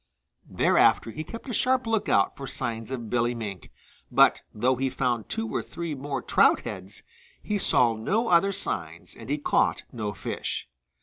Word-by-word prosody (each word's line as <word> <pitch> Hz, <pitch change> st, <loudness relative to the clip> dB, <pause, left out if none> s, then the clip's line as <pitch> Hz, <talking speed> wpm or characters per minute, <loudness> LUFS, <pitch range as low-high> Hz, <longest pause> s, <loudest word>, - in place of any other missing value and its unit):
Thereafter 115 Hz, -, +3 dB
he 155 Hz, +7 st, -5 dB
kept 230 Hz, -, -9 dB
a 245 Hz, -, -4 dB
sharp 255 Hz, +3 st, +2 dB
lookout 220 Hz, -, +2 dB
for 135 Hz, -, -7 dB
signs 115 Hz, -4 st, -4 dB
of 120 Hz, -5 st, -5 dB
Billy 120 Hz, 0 st, +1 dB
Mink, 105 Hz, -5 st, -6 dB, 0.4 s
but -, -, +5 dB
though 125 Hz, +5 st, +1 dB
he 135 Hz, +1 st, -1 dB
found 125 Hz, -3 st, -1 dB
two 225 Hz, 0 st, -2 dB
or -, -, 0 dB
three 170 Hz, -2 st, -5 dB
more 135 Hz, -2 st, -4 dB
trout -, -, +4 dB
heads, 95 Hz, +2 st, -7 dB, 0.4 s
he 210 Hz, -1 st, -1 dB
saw 120 Hz, -10 st, +4 dB
no 205 Hz, -, 0 dB
other 195 Hz, +1 st, +4 dB
signs -, -, -3 dB
and -, -, -11 dB
he 145 Hz, -, +1 dB
caught 145 Hz, -, +1 dB
no 110 Hz, -4 st, -3 dB
fish. 100 Hz, -, -4 dB
130 Hz, 170 wpm, -26 LUFS, 115-175 Hz, 0.4 s, but